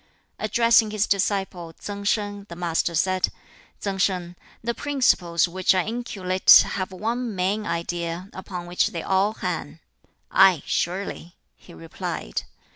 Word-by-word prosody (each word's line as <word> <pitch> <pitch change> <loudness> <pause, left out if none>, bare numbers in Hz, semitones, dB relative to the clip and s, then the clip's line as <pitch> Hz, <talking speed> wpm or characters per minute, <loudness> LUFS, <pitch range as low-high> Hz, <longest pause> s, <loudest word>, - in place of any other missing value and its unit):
Addressing 230 -2 +4
his 210 -1 0
disciple 190 -4 -1
Tsang 200 +4 -7
Sin, 205 -1 -1
the 170 - -7
Master 170 0 -1
said, 185 +3 +2 0.5
"Tsang 195 -1 -3
Sin, 180 -2 0 0.3
the 235 +1 -1
principles 215 -13 +2
which 185 +2 +2
I 185 - +1
inculcate 200 -5 +4
have 185 -1 -3
one 225 +4 -3
main 195 +4 -1
idea 170 +1 -3
upon 180 -2 -7
which 175 +1 +1
they 170 - -5
all 195 +2 +2
hang." - - -4 0.5
"Aye, 190 -6 +5
surely," 175 -1 -3 0.2
he - - -16
replied. 80 -6 -5
190 Hz, 130 wpm, -24 LUFS, 175-205 Hz, 0.5 s, Aye